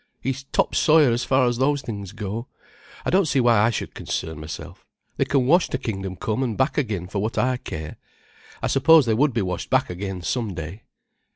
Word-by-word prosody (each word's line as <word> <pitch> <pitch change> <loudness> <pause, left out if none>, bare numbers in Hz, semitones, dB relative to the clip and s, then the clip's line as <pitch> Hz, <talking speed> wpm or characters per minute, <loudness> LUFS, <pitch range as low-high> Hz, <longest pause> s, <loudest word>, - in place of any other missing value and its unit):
He's 135 0 -3
top - - 0
sawyer 155 -4 +5
as 120 +1 0
far 130 -1 +3
as 120 -1 0
those 140 +1 +1
things 100 -4 -6
go. 110 +3 -5 0.6
I - - 0
don't 190 -2 +3
see 140 - +2
why 120 -3 +4
I 115 +2 +4
should 115 - -4
concern 80 -2 -4
myself. 75 0 -8 0.3
They - - +2
can 135 -3 +1
wash 170 +7 +4
to - - -1
kingdom 95 -7 -4
come 110 +6 -2
and 120 -5 -1
back 130 - +1
again 105 - -1
for 100 +2 -4
what 110 +3 -2
I 130 0 +2
care. 80 -9 -7 0.7
I - - +2
suppose 155 +2 +5
they 115 - +2
would 140 +6 +3
be 115 -4 0
washed 90 -1 -4
back - - +2
again 95 0 -5
some 110 -2 -2
day. 80 +7 -7
115 Hz, 210 wpm, -23 LUFS, 95-135 Hz, 0.7 s, sawyer